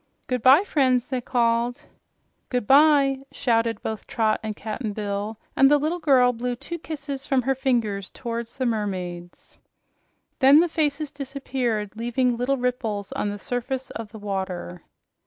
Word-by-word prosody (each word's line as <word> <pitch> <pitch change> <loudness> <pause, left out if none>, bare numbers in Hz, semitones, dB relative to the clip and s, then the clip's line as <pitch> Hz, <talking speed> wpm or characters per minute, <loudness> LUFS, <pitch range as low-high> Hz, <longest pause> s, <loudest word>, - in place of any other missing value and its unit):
"Goodbye, 255 - +5
friends!" 260 - +1
they 255 -2 -1
called. 235 0 0 0.7
"Goodbye!" 275 +2 +4
shouted 230 -2 0
both 220 -1 -5
Trot 220 -2 +1
and 215 -1 -4
Cap'n 215 0 -4
Bill, 205 +1 -3 0.2
and 270 - +6
the 295 - +5
little 310 +5 -1
girl 260 -6 +4
blew 245 +1 -3
two 335 +7 -6
kisses 280 -4 -6
from 265 -2 +2
her 270 +2 +2
fingers 235 -7 -1
toward 235 -1 -5
the 255 +3 -4
mermaids. 185 -6 -4 0.8
Then 275 +3 +7
the 345 - +4
faces 305 -2 -1
disappeared, 260 -6 -3
leaving 240 +2 0
little 250 +3 0
ripples 230 -5 -2
on 205 - -2
the 205 - -4
surface 250 +4 -4
of 220 -2 -7
the 220 - -9
water. 190 - -4
245 Hz, 145 wpm, -24 LUFS, 215-270 Hz, 0.8 s, Then